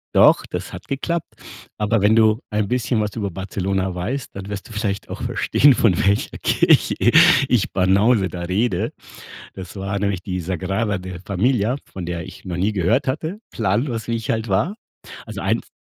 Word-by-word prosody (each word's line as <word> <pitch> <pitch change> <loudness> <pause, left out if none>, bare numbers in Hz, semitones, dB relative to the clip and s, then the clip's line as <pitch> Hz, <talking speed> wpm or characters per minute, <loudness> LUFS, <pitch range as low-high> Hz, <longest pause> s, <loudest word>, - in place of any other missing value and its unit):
Doch, - - +6
das - - -6
hat - - -9
geklappt, 170 +5 -3 0.5
aber 105 0 +1
wenn 105 +2 +5
du 110 -1 +4
ein 105 -1 0
bisschen 120 -1 0
was 105 -1 -3
über 100 -4 -3
Barcelona 95 0 -2
weißt, 120 +10 -4
dann 100 0 -7
wirst 100 +3 -6
du - - -13
vielleicht 105 -2 -3
auch - - -6
verstehen, 145 0 +4
von 105 -7 +3
welcher 100 +1 +1
Kirche, - - +3 0.5
ich 125 -6 +1
Banause 95 +3 +3
da 90 - -7
rede. 95 +7 -1 0.6
Das 95 +1 -9
war 100 +1 -3
nämlich 100 -2 -1
die 90 -1 -3
Sagrada 95 +4 -1
de 90 -1 -7
Família, 110 +4 +1
von 90 -3 -8
der 85 -1 -4
ich - - -12
noch 90 -2 -3
nie 100 +4 +1
gehört 105 - +1
hatte, 160 +9 -3
planlos 115 +3 -1
wie 115 - 0
ich 115 - -4
halt 110 0 -1
war. 145 - 0 0.5
Also - - -7
eins - - -1
100 Hz, 180 wpm, -21 LUFS, 95-115 Hz, 0.6 s, Doch